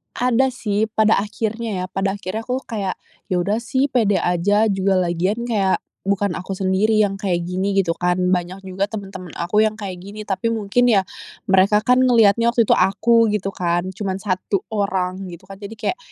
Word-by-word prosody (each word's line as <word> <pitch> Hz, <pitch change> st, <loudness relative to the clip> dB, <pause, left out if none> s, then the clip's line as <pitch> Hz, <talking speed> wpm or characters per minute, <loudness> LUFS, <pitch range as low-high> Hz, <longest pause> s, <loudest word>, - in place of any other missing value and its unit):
Ada 250 Hz, +1 st, +2 dB
sih 215 Hz, -2 st, -1 dB
pada 220 Hz, -1 st, +3 dB
akhirnya 215 Hz, -1 st, -3 dB
ya, -, -, -2 dB
pada 195 Hz, +1 st, -1 dB
akhirnya 205 Hz, +3 st, -5 dB
aku 255 Hz, +1 st, -2 dB
kayak, 200 Hz, -4 st, -3 dB, 0.3 s
"Ya 185 Hz, -, -1 dB
udah 210 Hz, +4 st, 0 dB
sih 260 Hz, +4 st, -1 dB
pede 215 Hz, -5 st, +2 dB
aja, 205 Hz, +5 st, +2 dB
juga 190 Hz, 0 st, +1 dB
lagian 180 Hz, +7 st, -1 dB
kayak 205 Hz, -5 st, +1 dB, 0.3 s
bukan 200 Hz, -1 st, +1 dB
aku 190 Hz, +1 st, -5 dB
sendiri 195 Hz, +3 st, +1 dB
yang 195 Hz, -1 st, -1 dB
kayak 175 Hz, -4 st, -1 dB
gini" 190 Hz, +3 st, -2 dB
gitu 175 Hz, -4 st, +2 dB
kan. 180 Hz, 0 st, +1 dB, 0.2 s
Banyak 180 Hz, +2 st, -2 dB
juga 190 Hz, +1 st, -2 dB
temen-temen 195 Hz, -4 st, -8 dB
aku 180 Hz, +5 st, 0 dB
yang 215 Hz, -, -1 dB
kayak 195 Hz, -4 st, -6 dB
gini, 205 Hz, +3 st, -8 dB
tapi 205 Hz, +3 st, -2 dB
mungkin 225 Hz, +2 st, +1 dB
ya 205 Hz, -5 st, +4 dB, 0.5 s
mereka 200 Hz, +3 st, +4 dB
kan 250 Hz, +1 st, +4 dB
ngelihatnya 235 Hz, -3 st, +4 dB
waktu 235 Hz, -1 st, +3 dB
itu -, -, 0 dB
aku 230 Hz, +4 st, +3 dB
gitu 195 Hz, -1 st, -1 dB
kan, 175 Hz, 0 st, -1 dB
cuman 190 Hz, -1 st, -3 dB
1 190 Hz, 0 st, -1 dB
orang 190 Hz, -2 st, -1 dB
gitu 170 Hz, 0 st, -10 dB
kan. 195 Hz, 0 st, -11 dB
Jadi 210 Hz, +2 st, -8 dB
kayak, 360 Hz, -, -2 dB
200 Hz, 185 wpm, -21 LUFS, 185-220 Hz, 0.5 s, ya